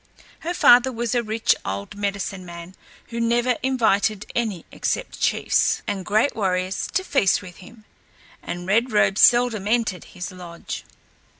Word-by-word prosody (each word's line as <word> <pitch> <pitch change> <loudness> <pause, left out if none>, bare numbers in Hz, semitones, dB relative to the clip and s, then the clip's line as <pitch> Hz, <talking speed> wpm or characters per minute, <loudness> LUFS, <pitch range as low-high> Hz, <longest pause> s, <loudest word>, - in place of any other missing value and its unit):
Her 345 +2 -4
father 245 -2 +6
was 235 -1 -2
a 240 - +2
rich 220 0 +1
old 100 +1 -5
medicine 200 -1 -3
man 170 0 -10 0.4
who 235 -1 -5
never 235 +1 +1
invited 215 -5 +1
any 215 -8 -2
except - - -3
chiefs - - +1
and 200 -2 -3
great 215 +9 +1
warriors 185 -2 -1
to 375 - +2
feast 205 - +2
with 180 -2 -11
him, 215 +3 -15 0.6
and 175 0 -6
Red 230 +6 +1
Robe 210 -2 +2
seldom 240 -4 +4
entered 220 -5 0
his 180 +1 -7
lodge. 175 -2 -8
210 Hz, 145 wpm, -23 LUFS, 185-240 Hz, 0.6 s, father